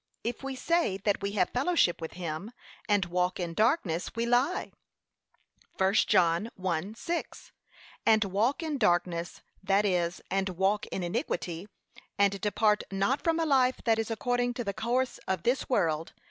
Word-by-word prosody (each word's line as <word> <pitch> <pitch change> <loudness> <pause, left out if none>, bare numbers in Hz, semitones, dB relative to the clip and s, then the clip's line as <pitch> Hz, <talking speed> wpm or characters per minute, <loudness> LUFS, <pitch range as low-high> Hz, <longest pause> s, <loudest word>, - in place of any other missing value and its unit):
'If 235 0 -3
we 270 -1 -4
say 335 - +1
that 200 +1 0
we 200 0 -2
have 195 -4 +1
fellowship 255 - +2
with 160 - -5
him, 175 +5 -5 0.4
and 205 -3 +3
walk 180 +1 -1
in 170 -2 -3
darkness, 210 - +1
we 230 0 0
lie.' 250 +9 +1 1.1
(I 190 0 +4
John 185 -1 +3
1:6) 190 - -3 0.5
'And 220 -1 +5
walk 220 - 0
in 305 -4 -2
darkness;' 175 -4 0 0.2
that 195 +1 +2
is, 175 -3 0
and 195 0 0
walk 195 +2 +1
in 185 - -4
iniquity, 175 - -3 0.5
and 200 -1 +2
depart 210 0 +2
not 200 +8 0
from 330 0 +1
a 325 - +1
life 260 -4 +3
that 225 -2 +3
is 225 - -2
according 245 +2 0
to 245 - -3
the 200 -2 -3
course 240 +5 -1
of 190 0 -1
this 245 +3 0
world. 165 - 0
205 Hz, 160 wpm, -29 LUFS, 180-245 Hz, 1.1 s, And